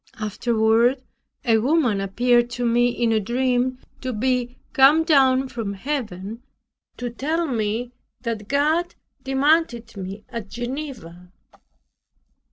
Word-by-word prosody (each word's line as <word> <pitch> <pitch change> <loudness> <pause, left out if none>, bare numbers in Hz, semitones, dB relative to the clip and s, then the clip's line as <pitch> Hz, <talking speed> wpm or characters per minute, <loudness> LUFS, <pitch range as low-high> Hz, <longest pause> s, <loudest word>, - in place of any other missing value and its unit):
Afterward 230 +3 +2 0.4
a 225 -2 +4
woman 245 -5 +2
appeared 240 +5 +2
to 245 - -1
me 240 +1 +3
in 240 -1 0
a 220 - +3
dream 250 +3 0 0.2
to 255 - -3
be 250 +1 -1 0.2
come 290 +4 +6
down 270 -4 +4
from 225 -5 -4
Heaven, 220 -4 -4 0.6
to 245 -1 -4
tell 315 +8 -1
me 235 -2 -2 0.3
that 225 -4 -4
God 310 +6 +1 0.3
demanded 270 -4 +1
me 195 +2 -7
at 230 -4 -6
Geneva. 235 - -7
245 Hz, 115 wpm, -23 LUFS, 220-265 Hz, 0.6 s, come